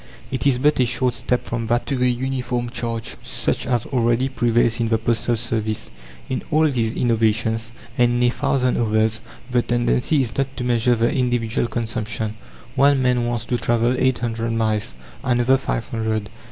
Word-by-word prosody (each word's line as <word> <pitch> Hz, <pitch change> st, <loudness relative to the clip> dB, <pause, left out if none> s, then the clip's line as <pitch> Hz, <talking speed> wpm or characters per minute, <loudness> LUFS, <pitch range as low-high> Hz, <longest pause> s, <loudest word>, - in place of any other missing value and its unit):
It 130 Hz, 0 st, 0 dB
is 130 Hz, -3 st, +3 dB
but 145 Hz, +3 st, +2 dB
a 125 Hz, -, +5 dB
short 125 Hz, +1 st, 0 dB
step 125 Hz, +2 st, -1 dB
from 115 Hz, -1 st, -3 dB
that 120 Hz, +1 st, +1 dB
to 135 Hz, -3 st, -2 dB
a -, -, +4 dB
uniform 125 Hz, -1 st, -2 dB
charge, 115 Hz, -3 st, -4 dB
such -, -, -2 dB
as 120 Hz, -3 st, 0 dB
already 120 Hz, 0 st, +1 dB
prevails 120 Hz, -2 st, +2 dB
in 115 Hz, -, +1 dB
the 115 Hz, 0 st, +2 dB
postal 115 Hz, +1 st, 0 dB
service. 110 Hz, -2 st, -1 dB, 0.4 s
In 130 Hz, -, -2 dB
all 155 Hz, +1 st, +4 dB
these 115 Hz, -3 st, 0 dB
innovations, 115 Hz, -1 st, +1 dB, 0.3 s
and 120 Hz, 0 st, +4 dB
in 120 Hz, -, +1 dB
a -, -, +2 dB
thousand 125 Hz, -2 st, +1 dB
others, 110 Hz, -1 st, +1 dB, 0.3 s
the 125 Hz, -1 st, +3 dB
tendency 120 Hz, +5 st, +1 dB
is 115 Hz, -4 st, -2 dB
not 135 Hz, 0 st, -2 dB
to 125 Hz, -, -3 dB
measure 120 Hz, 0 st, +2 dB
the 115 Hz, +1 st, +1 dB
individual 120 Hz, -2 st, 0 dB
consumption. 110 Hz, -2 st, -3 dB, 0.4 s
One 140 Hz, +1 st, +4 dB
man 125 Hz, -2 st, +2 dB
wants 120 Hz, -1 st, -2 dB
to 120 Hz, -, 0 dB
travel 120 Hz, +1 st, +2 dB
eight 130 Hz, -1 st, +2 dB
hundred 115 Hz, -1 st, -2 dB
miles, 110 Hz, -, 0 dB, 0.3 s
another 125 Hz, +1 st, +3 dB
five 115 Hz, -, -3 dB
hundred. 110 Hz, -2 st, -2 dB
120 Hz, 180 wpm, -21 LUFS, 115-125 Hz, 0.4 s, a